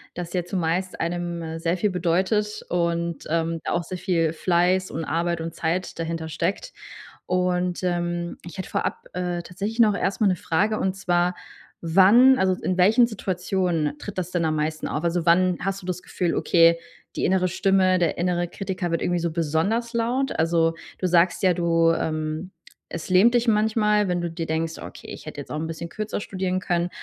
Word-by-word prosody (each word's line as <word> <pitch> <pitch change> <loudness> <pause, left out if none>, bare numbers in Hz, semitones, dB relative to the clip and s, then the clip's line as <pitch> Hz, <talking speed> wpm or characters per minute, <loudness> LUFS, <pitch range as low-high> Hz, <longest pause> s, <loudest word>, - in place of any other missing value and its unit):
das 175 -1 -6
ja 180 -1 0
zumeist 180 0 -2
einem 170 -1 -3
sehr 165 +2 0
viel 210 +3 +1
bedeutet 190 +5 0
und, 170 -2 -1
ähm, 165 0 0
auch 170 - 0
sehr 185 +2 -6
viel 165 -4 +1
Fleiß 180 +2 +1
und 160 +1 -4
Arbeit 170 0 -1
und 165 0 -5
Zeit 170 +3 -2
dahinter 165 -1 -3
steckt. 190 - -2 0.5
Und, 180 0 0
ähm, 175 -1 -2
ich 175 - -9
hätte 185 - -5
vorab, - - -2
äh, 180 -1 -2
tatsächlich 200 +6 -5
noch 215 -3 +5
erstmal 200 +1 +1
'ne 185 - +2
Frage, 205 +6 0
und 190 0 0
zwar, 180 -1 +1 0.5
wann 200 +10 +6
also, 190 0 +3
in 185 - -1
welchen 220 +6 +5
Situationen 180 -7 -1
tritt 205 -2 -8
das 180 0 -4
denn 170 -2 0
am 155 - 0
meisten 155 +1 -2
auf? 150 - -3
Also, 170 0 0
wann 180 +1 +4
hast 195 +1 -2
du - - -12
das 180 0 -3
Gefühl: 175 -2 -1
„Okay, 170 -1 +4 0.4
die - - -2
innere 185 0 +2
Stimme, 190 0 +2
der 170 -3 0
innere 175 0 0
Kritiker 190 -3 -4
wird 165 - 0
irgendwie 175 0 0
so 170 -1 -1
besonders 170 - 0
laut?“ 245 +4 0
Also, 165 0 +2 0.2
du 185 - 0
sagst 175 0 +3
ja, 185 -1 +5
du, 165 -1 +3
ähm, 155 +3 -3 0.4
es 170 +2 -6
lähmt 195 +6 +5
dich 240 0 +2
manchmal, 210 -1 +2
wenn 175 -1 0
du 175 - -2
dir 165 0 -4
denkst: 160 +1 -2
„Okay, - - -10
ich - - -9
hätte - - -6
jetzt - - -12
auch - - -3
'n 160 - -3
bisschen 165 +1 -6
kürzer 215 +4 -4
studieren 185 -2 -2
können.“ 175 -1 -1
175 Hz, 190 wpm, -24 LUFS, 165-190 Hz, 0.5 s, wann